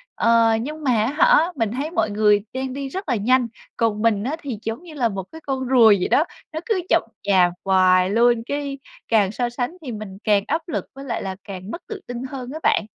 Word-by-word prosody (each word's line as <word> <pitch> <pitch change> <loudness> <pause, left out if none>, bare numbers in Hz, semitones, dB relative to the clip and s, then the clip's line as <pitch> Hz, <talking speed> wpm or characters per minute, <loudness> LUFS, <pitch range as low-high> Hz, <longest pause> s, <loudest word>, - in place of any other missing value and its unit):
Ờ, 230 -1 +4
nhưng 305 +5 -6
mà 265 - +2
á - - +1
hả, 330 +2 +5
mình 225 -6 -1
thấy 280 +6 -3
mọi 220 - +1
người 210 0 +3
đang 260 0 -3
đi 275 0 -4
rất 375 +1 -6
là 250 - +2
nhanh, 245 +4 +2 0.3
còn 220 -3 0
mình 215 -3 +2
á 275 +6 -2
thì 250 -7 -5
giống 225 +8 -5
như 340 -3 -11
là 245 -6 +1
một 195 -1 -4
cái 320 - -10
con 265 -3 -3
rùa 245 -4 +6
vậy - - 0
đó, 310 - +4 0.3
nó 315 - -2
cứ 430 -6 0
chậm - - +4 0.2
chạp 185 -3 +4
hoài 185 -1 +4
luôn. 235 +2 +3
Cái 280 0 -4 0.3
càng 205 -4 +3
so 240 +2 -1
sánh 245 +8 -4
thì 250 - -4
mình 210 -3 -7
càng 205 -2 +3
áp 320 +3 0
lực 330 - -3
với 275 0 -9
lại 245 - -3
là 190 -1 -4
càng 195 0 -8
mất 340 - -6
tự 420 -3 -7
tin 245 0 -5
hơn 260 -2 -6
á 315 - -5
bạn. - - +2
240 Hz, 240 wpm, -22 LUFS, 210-275 Hz, 0.3 s, rùa